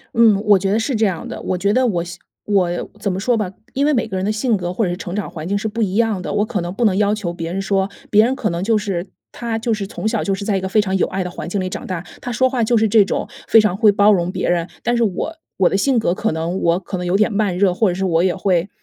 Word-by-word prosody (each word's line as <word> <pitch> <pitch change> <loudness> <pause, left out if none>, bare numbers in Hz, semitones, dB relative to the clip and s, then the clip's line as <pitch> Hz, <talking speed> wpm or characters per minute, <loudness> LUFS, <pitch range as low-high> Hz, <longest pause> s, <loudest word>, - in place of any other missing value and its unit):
嗯， 225 -3 +5
我 205 -2 +5
觉 195 +1 -1
得 210 - +2
是 245 +3 -1
这 220 0 +2
样 180 -4 -4
的。 - - -7
我 185 - -2
觉 200 +3 +1
得 255 +2 +3
我 175 -7 0 0.4
我 180 -4 0
怎 200 -1 -1
么 185 - -3
说 240 +5 +1
吧， 210 -5 -2 0.2
因 275 - 0
为 300 - +3
每 235 -4 0
个 200 - -5
人 185 - -1
的 210 - +1
性 220 +2 +1
格 175 -3 -3
或 220 - 0
者 175 - -1
是 175 - -3
成 180 -2 -6
长 210 - -3
环 155 0 -7
境 200 +2 0
是 215 - -2
不 225 +2 -3
一 195 -3 0
样 225 -4 +1
的， - - -4
我 205 +1 +1
可 215 -4 -2
能 175 0 -4
不 235 +4 0
能 200 -4 +3
要 210 0 +2
求 185 -5 -4
别 165 -1 -5
人 190 - -2
说 195 0 0 0.2
别 215 +1 +6
人 250 +3 +1
可 220 -5 -1
能 170 +1 -3
就 220 +2 +2
是 195 -3 -3 0.2
他 235 -2 -3
就 230 +1 -1
是 205 -2 -3
从 210 - -4
小 220 -1 0
就 195 - 0
是 200 - -6
在 205 - +1
一 190 - 0
个 190 - -3
非 215 - +3
常 190 -2 0
有 - - +1
爱 190 0 -2
的 180 - -5
环 175 - -6
境 200 - -1
里 185 - -2
长 185 - -6
大， 185 -3 -3 0.2
他 245 - -4
说 260 +3 +2
话 250 -3 0
就 235 +2 +2
是 220 0 +3
这 215 0 +5
种 - - -2 0.2
非 225 - +7
常 210 -4 +2
会 210 +1 +5
包 205 +1 +5
容 175 -2 0
别 185 -1 -2
人。 170 -1 +1 0.2
但 240 - +1
是 235 - +2
我 225 - -2 0.2
我 185 - +4
的 - - -1
性 260 +5 +2
格 220 -6 +1
可 220 +4 -1
能 165 +4 -2
我 170 +1 +2
可 190 0 -5
能 180 - -4
有 180 +2 +2
点 215 +1 +2
慢 200 -3 0
热， 190 -1 +3
或 205 +3 +2
者 175 - -2
是 190 +1 -1
我 170 -2 +2
也 185 -1 +1
会 185 -1 0
200 Hz, 345 characters per minute, -19 LUFS, 185-220 Hz, 0.4 s, 非